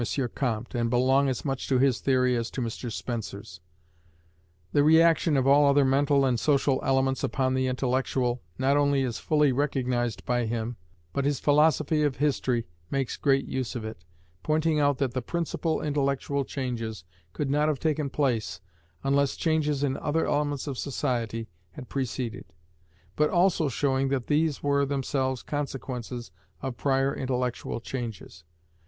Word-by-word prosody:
Comte, 120 -3 -2
and 120 -1 0
belong 130 +3 +3
as 130 - -3
much 135 -2 -2
to 130 - +3
his 130 -1 +3
theory 125 -2 +2
as 115 -1 -2
to - - -6
Mr 120 0 -4
Spencer's. 110 -6 -5 1.1
The 145 - +4
re 160 +2 +6
action 165 -2 +4
of 130 - +2
all 140 +1 +6
other 140 0 +4
mental 140 +1 +3
and 125 -3 +1
social 140 -1 +2
elements 135 0 +1
upon 130 -2 0
the 130 0 +1
intellectual 130 -1 0 0.2
not 135 +2 +2
only 140 -1 +2
is 120 -3 -3
fully 150 -2 +3
recognized 125 -4 -1
by 120 -2 0
him, 115 +1 -3 0.4
but 140 - 0
his 140 -1 0
philosophy 150 +1 +3
of 145 -3 +1
history 130 -4 0 0.2
makes 135 -3 -1
great 135 -1 +2
use 130 0 -3
of 115 -2 -4
it, 110 -6 -8 0.4
pointing 155 - +1
out 145 -2 +2
that 130 -3 -1
the 130 - -1
principal 165 +2 -2
intellectual 140 -1 0
changes 115 - -4 0.3
could 135 - -2
not 150 +1 +2
have 150 -4 0
taken 150 -2 0
place 115 - -1 0.4
unless 140 0 +2
changes 150 -3 +1
in 135 -2 0
other 160 +2 0
elements 145 -2 -1
of 140 -4 -4
society 120 -5 -2 0.3
had 125 - -10
preceded; 125 -2 -3 0.7
but 150 0 +2
also 175 -4 +2
showing 135 +1 +1
that 135 -3 -1
these 150 -1 +1
were 140 0 +2
themselves 135 -2 -1
consequences 125 -4 -5 0.3
of 130 -2 -4
prior 135 +1 +1
intellectual 125 -2 -2
changes. 115 -9 -6
135 Hz, 155 wpm, -27 LUFS, 125-145 Hz, 1.1 s, re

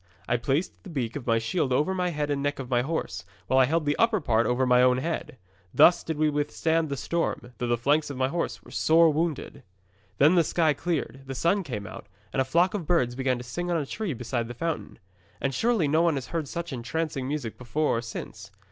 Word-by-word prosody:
I 120 - +2
placed 135 +8 0
the - - -11
beak 125 -8 -3
of 140 -4 -6
my 115 -1 +3
shield 130 +5 -1
over 150 +9 +2
the 180 -1 0
head 150 -3 -2
and 140 -1 -1
neck 145 +1 -1
of 130 -1 -7
my 120 -1 +3
horse, 125 - -3 0.2
while 130 +7 +3
I 130 - +6
held 160 +3 0
the 145 0 +1
upper 230 -2 +3
part 115 -7 +1
over 125 +2 +1
my 125 0 +5
own 125 0 +4
head. 155 0 -3 0.4
Thus 175 0 +6
did 160 -2 -3
we 155 0 +3
withstand 150 +2 0
the 140 - -3
storm, 130 -5 -2
though 120 - -1
the 120 0 +1
flanks 145 +6 +1
of 140 - -6
my 130 0 +2
horse 170 +5 -3
were - - -15
sore 160 0 +4
wounded. 160 -1 -2 0.6
'Then 150 +5 +6
the 175 -2 +5
sky 160 -1 +2
cleared, 145 -2 -3
the 135 - -5
sun 170 +9 +2
came 120 - -5
out, - - -9 0.3
and 135 - +2
a - - +1
flock 170 +7 +2
of 185 -7 -4
birds 130 -9 +2
began 130 0 0
to 120 - -7
sing 175 +9 -4
on 170 - +1
a 150 - -1
tree 190 0 -3
beside 120 0 -3
the 120 - -7
fountain. 165 +4 -3 0.4
And 135 - -1
surely 220 - +2
no 155 +3 +3
one 170 -3 +3
has 135 -2 -3
heard 165 -3 -2
such 170 +1 -5
entrancing 135 +2 -3
music 140 -6 -3
before 135 +5 0
or - - -1
since. 110 -3 -8
145 Hz, 235 wpm, -27 LUFS, 125-165 Hz, 0.6 s, I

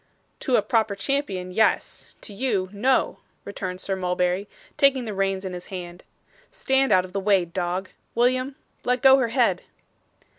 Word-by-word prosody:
'To 260 -4 +1
a 210 - +3
proper 220 -4 +1
champion 200 -7 -2
yes. 220 +4 0
To 205 - -9
you 200 -4 -1
no,' 250 +6 +1 0.3
returned 185 -2 -5
Sir 195 0 -2
Mulberry, 180 +1 -1 0.3
taking 270 -3 +3
the 215 - -4
reins 195 0 -1
in 185 - -4
his 180 0 -8
hand. 175 -2 -8 0.5
'Stand 265 0 +1
out 185 0 +4
of 185 - -13
the 200 - -1
way, 195 -2 +3
dog. 180 +2 -3 0.2
William, 255 +3 +1 0.3
let 250 +1 0
go 265 0 +8
her 250 - +1
head. 230 - +1
200 Hz, 160 wpm, -24 LUFS, 185-250 Hz, 0.5 s, go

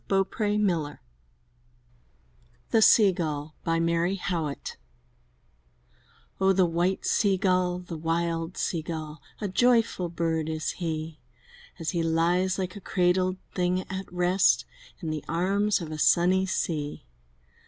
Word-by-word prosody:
83 200 +2 +1
M 210 0 +2
Y - - +4
BOOK 175 -3 +1
HOUSE - - -18 1.7
THE 225 - +4
SEA 215 -2 +7
GULL 155 -3 -4
Mary 165 +2 +1
Howitt 165 -6 -4 1.6
OH, 195 0 +4
the 185 -1 +4
white 175 +3 0
Sea 200 -3 +2
gull, 180 -2 +1
the 175 -3 -7
wild 165 +1 -1
Sea 165 - -1
gull, 155 -2 -6 0.2
A 210 - -2
joyful 225 -3 +2
bird 165 -2 -1
is 155 -1 -2
he, 160 -2 -4 0.6
As 165 -3 -3
he 170 - -1
lies 170 +3 +1
like 185 0 -3
a 205 - -8
cradled 185 0 +1 0.2
thing 180 0 0
at 190 0 -5
rest 180 +1 +3 0.4
In 160 - -2
the 155 -2 -4
arms 195 +4 +1
of 160 -2 -6
a 155 - -5
sunny 185 +4 +3
sea! 150 - -2
175 Hz, 135 wpm, -27 LUFS, 165-190 Hz, 1.7 s, SEA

